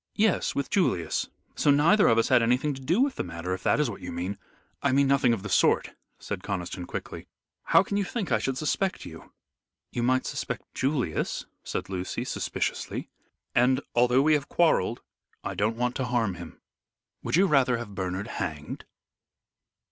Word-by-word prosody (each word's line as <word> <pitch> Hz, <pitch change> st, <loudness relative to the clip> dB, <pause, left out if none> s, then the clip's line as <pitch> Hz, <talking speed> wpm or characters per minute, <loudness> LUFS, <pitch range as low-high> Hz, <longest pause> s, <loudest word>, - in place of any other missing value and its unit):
"Yes, 215 Hz, -3 st, +2 dB
with 140 Hz, -, -2 dB
Julius; 130 Hz, -, +1 dB, 0.2 s
so -, -, +1 dB
neither 160 Hz, +9 st, +5 dB
of 115 Hz, -, +4 dB
us 115 Hz, -, +2 dB
had 130 Hz, -2 st, +5 dB
anything 125 Hz, +5 st, +2 dB
to 135 Hz, -, -9 dB
do 170 Hz, -, +2 dB
with 275 Hz, 0 st, +1 dB
the -, -, -1 dB
matter, 85 Hz, +1 st, -4 dB
if 95 Hz, -, -4 dB
that -, -, +2 dB
is 150 Hz, -, +2 dB
what 110 Hz, -, -6 dB
you 90 Hz, -, -6 dB
mean." 90 Hz, +4 st, -4 dB, 0.4 s
"I -, -, +2 dB
mean 140 Hz, +1 st, +4 dB
nothing 135 Hz, -2 st, +3 dB
of 110 Hz, -4 st, -1 dB
the -, -, -4 dB
sort," 95 Hz, -, +3 dB, 0.3 s
said 100 Hz, -3 st, -5 dB
Conniston, 90 Hz, -2 st, -4 dB
quickly. -, -, -6 dB, 0.4 s
"How -, -, +5 dB
can 200 Hz, -, -2 dB
you 205 Hz, -, +2 dB
think 200 Hz, 0 st, -4 dB
I -, -, +3 dB
should 135 Hz, -1 st, -2 dB
suspect 185 Hz, +6 st, -1 dB
you?" 80 Hz, -1 st, -11 dB, 0.6 s
"You 120 Hz, -, -2 dB
might 130 Hz, +2 st, +2 dB
suspect -, -, -5 dB
Julius," 130 Hz, -, -1 dB, 0.2 s
said -, -, -4 dB
Lucy, 95 Hz, -1 st, -3 dB
suspiciously, -, -, -3 dB, 0.4 s
"and 125 Hz, +2 st, +4 dB
although 125 Hz, +2 st, +4 dB
we 155 Hz, +1 st, +4 dB
have 145 Hz, -2 st, 0 dB
quarrelled 140 Hz, -, +2 dB, 0.4 s
I -, -, -3 dB
don't 110 Hz, +2 st, 0 dB
want 125 Hz, 0 st, 0 dB
to 130 Hz, -, -1 dB
harm 115 Hz, -5 st, 0 dB
him." 85 Hz, -2 st, -10 dB, 0.6 s
"Would -, -, -1 dB
you 190 Hz, +3 st, +5 dB
rather 135 Hz, -7 st, +3 dB
have 115 Hz, -3 st, -7 dB
Bernard 95 Hz, +1 st, -3 dB
hanged?" 75 Hz, -9 st, -5 dB
125 Hz, 185 wpm, -27 LUFS, 95-145 Hz, 0.6 s, neither